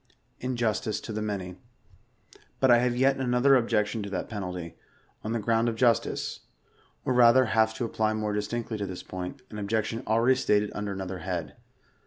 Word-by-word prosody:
tVJrStlCE 120 -3 -1
TO 110 - -6
THE 110 - -3
MAKT. 95 -4 -4 1.0
But 130 -2 +4
I 120 - +7
have 120 0 +1
yet 135 +2 +3
another 130 +1 +3
objection 115 -3 +1
to 100 - -5
that 95 - -3
penalty, 90 -5 -5 0.5
on 110 - -3
the - - +1
ground 115 +2 +2
of 115 - -3
justice; 120 -1 +1 0.7
or - - +1
rather 125 +1 +6
have 110 -1 +2
to 120 - -2
apply 110 -1 0
more 105 -1 -2
distinctly 110 +1 -3
to 100 - -2
this 90 -1 -7
point, 95 +8 -7
an 105 - -6
objection 110 +2 -1
already 115 +4 +4
stated 105 -4 +2
under 105 -1 -3
another 95 -1 -5
head. 90 0 -4
110 Hz, 175 wpm, -27 LUFS, 100-120 Hz, 1.0 s, I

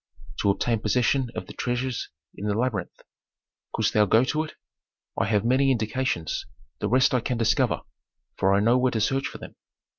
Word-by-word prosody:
"To 100 - +2
obtain 110 +3 +1
possession 125 +3 +1
of - - -4
the - - -10
treasures 125 0 -2 0.2
in 105 - -5
the 100 - 0
labyrinth." 115 -7 -2 0.7
"Couldst - - 0
thou 105 -1 +5
go 110 +5 +5
to 150 +4 0
it?" 155 - -12 0.6
"I 95 - +1
have 105 0 +1
many 130 +3 +3
indications; 115 -7 -1 0.3
the - - -1
rest 130 +2 +4
I 125 - +3
can 120 +1 -2
discover, 115 -1 +2 0.5
for 95 0 +2
I 100 +1 +4
know 120 +4 +4
where 130 0 +3
to 110 - 0
search 135 +5 +1
for - - -8
them." - - -11
120 Hz, 185 wpm, -25 LUFS, 105-130 Hz, 0.7 s, thou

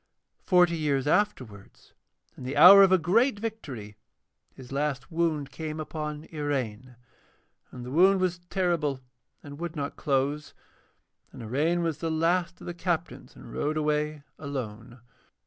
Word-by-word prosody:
Forty 180 -3 +4
years 145 -4 0
afterwards, 130 - -2 0.4
in - - -13
the 135 +3 -4
hour 190 +6 +10
of 195 -1 +6
a 185 - +6
great 210 - +2
victory, 145 - -7 0.6
his 130 -1 -13
last 140 -2 -2
wound 160 -4 -1
came 155 +2 -6
upon 150 -1 -5
Iraine, 130 -5 -3 0.7
and 125 -1 -9
the 125 - -7
wound 190 +6 +5
was 180 -1 -1
terrible 170 -8 0 0.4
and 145 0 -10
would 170 -1 -5
not 145 -2 -4
close. 140 +2 -1 0.8
And 120 - -10
Iraine 155 +10 0
was 160 -2 -2
the 165 - -2
last 170 +2 0
of - - -10
the 175 - -5
captains, 175 -1 -4
and - - -12
rode 150 +1 -1
away 150 -1 -1 0.2
alone. 120 -4 -7
150 Hz, 145 wpm, -27 LUFS, 135-175 Hz, 0.8 s, hour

